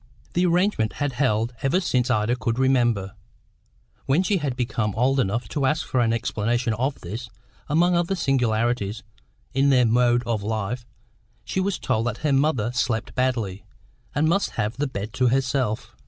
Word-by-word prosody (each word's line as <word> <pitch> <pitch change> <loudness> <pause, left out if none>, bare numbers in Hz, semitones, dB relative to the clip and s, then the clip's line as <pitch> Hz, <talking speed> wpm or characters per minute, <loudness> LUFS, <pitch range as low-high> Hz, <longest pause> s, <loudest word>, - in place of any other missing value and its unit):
The 180 +1 +2
arrangement 175 - +1
had 145 -1 -2
held 120 -2 +1
ever 135 +7 +2
since 125 -8 0
Ida 110 0 +2
could 115 -2 -2
remember; 120 -7 +2 0.9
when 145 +7 +3
she 195 +1 +1
had 145 -7 -2
become 115 -4 -1
old 130 +4 +2
enough 115 +1 0
to 140 -4 0
ask 155 +3 0
for 130 - -1
an 115 -2 +3
explanation 115 +1 0
of 130 +6 -2
this, 110 +7 -6 0.4
among 175 +4 +3
other 175 +2 +1
singularities 115 - 0 0.5
in 135 +2 +3
their 125 -3 +5
mode 120 +1 +3
of 115 -3 -1
life, 110 +3 -3 0.6
she - - -2
was 190 0 0
told 120 -3 -1
that 115 -2 -2
her 145 - +3
mother 135 -5 +2
slept 125 -2 -1
badly, 115 -7 -1 0.5
and 150 +2 +2
must 195 +5 +2
have 110 0 -1
the 145 +1 0
bed 105 -3 -5
to 130 -1 +2
herself. 130 -3 0
125 Hz, 170 wpm, -24 LUFS, 115-140 Hz, 0.9 s, their